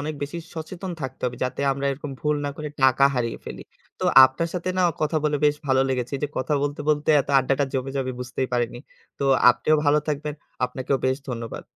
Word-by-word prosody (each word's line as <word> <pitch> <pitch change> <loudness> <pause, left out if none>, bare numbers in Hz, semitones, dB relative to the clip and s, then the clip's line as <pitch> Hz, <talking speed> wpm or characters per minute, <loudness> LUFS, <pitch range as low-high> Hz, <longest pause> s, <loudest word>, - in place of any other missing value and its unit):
অনেক 150 +1 -3
বেশি 145 +4 -4 0.2
সচেতন 175 +3 -6
থাকতে 130 -2 -6
হবে 125 -1 -2
যাতে 130 - -3
আমরা 140 +1 -4
এরকম 145 +1 -7
ভুল 150 0 +1
না 145 - -1
করে 155 0 -5
টাকা 130 +1 +5
হারিয়ে 115 -2 -2
ফেলি। - - -7 0.4
তো - - -1 0.2
আপনার 130 +6 0
সাথে 180 0 -3
না - - +3 0.2
কথা 155 +1 +1
বলে 150 -1 +2
বেশ 150 0 +3
ভালো 130 -1 +3
লেগেছে। 125 0 -2
এইযে 145 +1 -2
কথা 130 +3 0
বলতে, 145 0 -2
বলতে, 150 -1 +1
এত - - -7
আড্ডাটা 135 +2 +1
জমে 135 0 -1
যাবে 130 -1 -1
বুঝতেই 125 +1 -3
পারিনি। 120 -1 -1 0.4
তো - - -1 0.3
আপনিও 155 +5 +2
ভালো 145 +1 +4
থাকবেন, 150 0 -2 0.3
আপনাকেও 130 +2 -1
বেশ 130 0 +2
ধন্যবাদ, 115 -2 -5
140 Hz, 205 wpm, -24 LUFS, 130-150 Hz, 0.4 s, টাকা